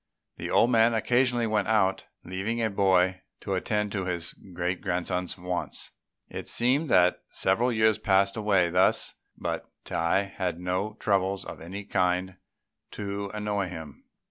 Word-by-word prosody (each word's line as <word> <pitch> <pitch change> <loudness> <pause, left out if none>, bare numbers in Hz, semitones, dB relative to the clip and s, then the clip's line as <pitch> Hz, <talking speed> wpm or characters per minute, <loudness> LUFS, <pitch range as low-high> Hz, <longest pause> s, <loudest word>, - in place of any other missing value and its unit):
The - - -5
old 120 - +4
man 115 0 +4
occasionally 120 +1 +2
went 105 -2 0
out, 95 -4 +2 0.2
leaving 95 +6 -3
a 110 -2 +1
boy 95 -2 +3 0.2
to 100 - -3
attend 105 +2 -1
to 95 -3 -2
his 85 -2 -3
great 90 -1 -4
grandson's 90 0 -2
wants. 90 0 -4 0.4
It - - -7
seemed 135 +6 +1
that 90 0 +4
several 115 +7 +1
years 110 -2 +3
passed 100 0 +3
away 100 -6 +2
thus, 90 +2 +3 0.2
but - - -3 0.2
Tai 85 +4 +1
had 95 -3 -3
no 90 +4 -2
troubles 95 -2 +1
of - - -8
any 95 +5 -6
kind 95 -1 0 0.6
to 100 -1 -4
annoy 105 -2 -1
him. 80 -5 -9
95 Hz, 145 wpm, -27 LUFS, 90-105 Hz, 0.6 s, old